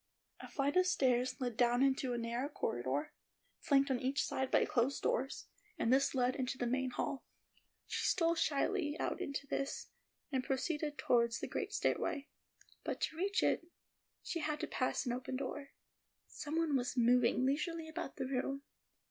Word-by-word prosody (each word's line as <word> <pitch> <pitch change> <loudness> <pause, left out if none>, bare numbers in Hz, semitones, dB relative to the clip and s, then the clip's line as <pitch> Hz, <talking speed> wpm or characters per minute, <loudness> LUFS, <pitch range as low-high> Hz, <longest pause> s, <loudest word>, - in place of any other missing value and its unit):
A - - -8
flight 280 +1 0
of 365 0 +5
stairs 255 -4 +2
led 245 -3 -2
down 245 +2 +4
into 265 -1 +2
a - - -1
narrow 235 +4 -2
corridor, 130 - -2 0.5
flanked 275 -1 +3
on 255 - +1
each 265 +3 0
side 265 0 -1
by - - +4
closed 250 +3 +1
doors, 265 +3 0 0.3
and 235 - +3
this 275 +1 +3
led 250 0 +2
into 255 -1 -2
the 245 - -1
main 260 +2 0
hall. 265 +2 -3 0.6
She - - -1
stole 335 -2 +3
shyly 305 0 +1
out - - -1
into 280 0 -3
this, 275 0 -3 0.4
and 260 -2 0
proceeded 295 +3 -1
toward 235 -1 +3
the - - -3
great 415 -1 -3
stairway; 285 -7 0 0.5
but - - -3
to - - -1
reach 390 +4 +1
it, 335 - +2 0.6
she 335 - -2
had 305 -1 -1
to - - 0
pass 255 - 0
an 245 - 0
open 255 +1 -4
door. 275 +1 -4 0.6
Some 295 +2 -5
one 325 -3 +2
was 255 0 -1
moving 245 +1 +4
leisurely 320 +4 0
about 315 -3 -6
in - - 0
the 270 - -4
room. 275 +2 -1
270 Hz, 175 wpm, -36 LUFS, 250-295 Hz, 0.6 s, of